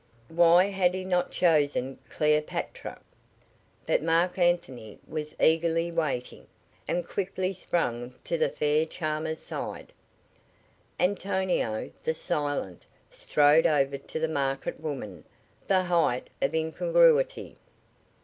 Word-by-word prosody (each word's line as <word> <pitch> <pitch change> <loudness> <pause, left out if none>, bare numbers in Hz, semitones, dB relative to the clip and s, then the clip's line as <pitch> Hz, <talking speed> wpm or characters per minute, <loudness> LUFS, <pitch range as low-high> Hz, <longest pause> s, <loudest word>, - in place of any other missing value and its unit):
Why 170 +2 +5
had 190 -2 +1
he 185 - -4
not 180 -1 0
chosen 145 -6 +1
Cleopatra? 150 0 -1 0.9
But - - +2
Marc 170 +3 +1
Anthony 135 - 0
was 150 -1 -5
eagerly 165 +1 +2
waiting, 150 -7 -3 0.4
and 175 -1 -1
quickly 190 -1 -2
sprang 125 -9 -2
to - - -2
the - - +1
fair 150 +2 +1
charmer's 155 -1 -3
side. - - -7 1.1
Antonio, 185 - -1
the 160 - -1
silent, 145 - -3 0.3
strode 150 +3 +4
over 140 -3 +1
to 160 - -6
the 160 - 0
market 135 -3 -2
woman 135 - -6 0.4
the 190 -1 +3
height 170 -8 +1
of 135 - 0
incongruity. - - +2
160 Hz, 110 wpm, -27 LUFS, 145-180 Hz, 1.1 s, Why